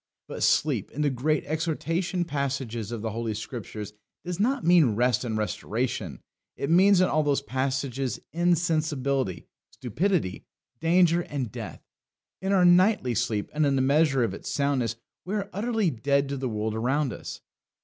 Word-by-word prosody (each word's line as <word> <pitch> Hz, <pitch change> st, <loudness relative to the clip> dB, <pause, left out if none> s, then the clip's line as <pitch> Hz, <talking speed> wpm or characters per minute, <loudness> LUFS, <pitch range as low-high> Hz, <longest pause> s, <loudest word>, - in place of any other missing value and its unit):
But -, -, -7 dB
sleep -, -, +2 dB
in 150 Hz, -, -3 dB
the 145 Hz, -, +2 dB
great 145 Hz, +4 st, 0 dB
exhortation 165 Hz, +3 st, -1 dB
passages 135 Hz, -7 st, -3 dB
of 115 Hz, -2 st, -5 dB
the 110 Hz, -, -2 dB
Holy 115 Hz, 0 st, -3 dB
Scriptures 105 Hz, -2 st, -6 dB, 0.3 s
does 180 Hz, 0 st, -4 dB
not 255 Hz, +5 st, +1 dB
mean 165 Hz, -10 st, +5 dB
rest 125 Hz, +1 st, +2 dB
and 110 Hz, -3 st, -2 dB
restoration; 110 Hz, -, -3 dB, 0.4 s
it 140 Hz, -, -2 dB
means 190 Hz, +2 st, +6 dB
in 185 Hz, -, +4 dB
all 155 Hz, -, +2 dB
those 140 Hz, -2 st, +1 dB
passages 130 Hz, -1 st, -2 dB
insensibility, 155 Hz, -, 0 dB, 0.2 s
stupidity, 150 Hz, -, -1 dB, 0.4 s
danger, 170 Hz, +1 st, +4 dB
and 135 Hz, -9 st, -4 dB
death. -, -, -8 dB, 0.6 s
In 190 Hz, +1 st, -1 dB
our 185 Hz, -2 st, +4 dB
nightly 180 Hz, -, +4 dB
sleep, 110 Hz, -3 st, -1 dB
and 155 Hz, +1 st, +1 dB
in 140 Hz, -2 st, +2 dB
the 130 Hz, -, +2 dB
measure 140 Hz, -1 st, +3 dB
of 110 Hz, -5 st, -1 dB
its -, -, -7 dB
soundness, 140 Hz, -5 st, 0 dB, 0.3 s
we 195 Hz, +4 st, -3 dB
are 200 Hz, -1 st, -3 dB
utterly 220 Hz, -3 st, 0 dB
dead 140 Hz, +3 st, 0 dB
to 140 Hz, -, -3 dB
the 130 Hz, -1 st, -2 dB
world 110 Hz, 0 st, -2 dB
around 130 Hz, +3 st, 0 dB
us. -, -, -8 dB
140 Hz, 160 wpm, -26 LUFS, 120-170 Hz, 0.6 s, means